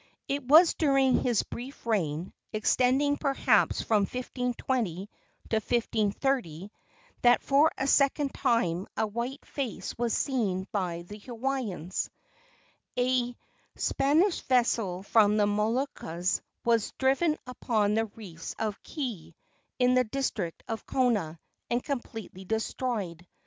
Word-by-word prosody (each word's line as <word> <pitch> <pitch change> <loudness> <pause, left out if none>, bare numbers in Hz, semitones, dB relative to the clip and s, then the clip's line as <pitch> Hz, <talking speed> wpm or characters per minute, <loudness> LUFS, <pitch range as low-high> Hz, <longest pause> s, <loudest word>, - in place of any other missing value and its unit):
It 280 0 -1
was 315 +7 +7
during 275 -4 +3
his 240 -4 +2
brief 255 +2 -9
reign 175 -6 -1 0.2
extending, 260 +6 +2
perhaps, 275 -2 +2
from 215 -2 +3
1520 245 -6 -2 0.4
to 220 - +3
1530 215 - -1 0.5
that 245 0 +5
for 285 +3 +4
a 270 - -1
second 280 0 +3
time 200 -9 +1
a - - +2
white 235 +6 -4
face 225 -9 -4
was 240 -1 +1
seen 205 -9 -1
by 175 -4 -2
the 205 +4 -10
Hawaiians. 230 - -3 0.9
A 245 -1 +1 0.4
Spanish 320 +8 +2
vessel 230 -7 +1
from 210 0 +4
the 210 - +4
Moluccas 210 - -1 0.2
was 230 -2 +2
driven 275 +4 +2
upon 220 -4 0
the 225 +1 +2
reefs 190 -6 -9
of 215 -2 -3
Keei, 205 - -5 0.4
in 250 0 +4
the 255 0 +4
district 215 -8 -3
of 225 -2 -5
Kona, 210 -11 +1 0.3
and 240 +1 0
completely 225 -8 -5
destroyed. 210 -4 -3
235 Hz, 120 wpm, -29 LUFS, 200-265 Hz, 0.9 s, was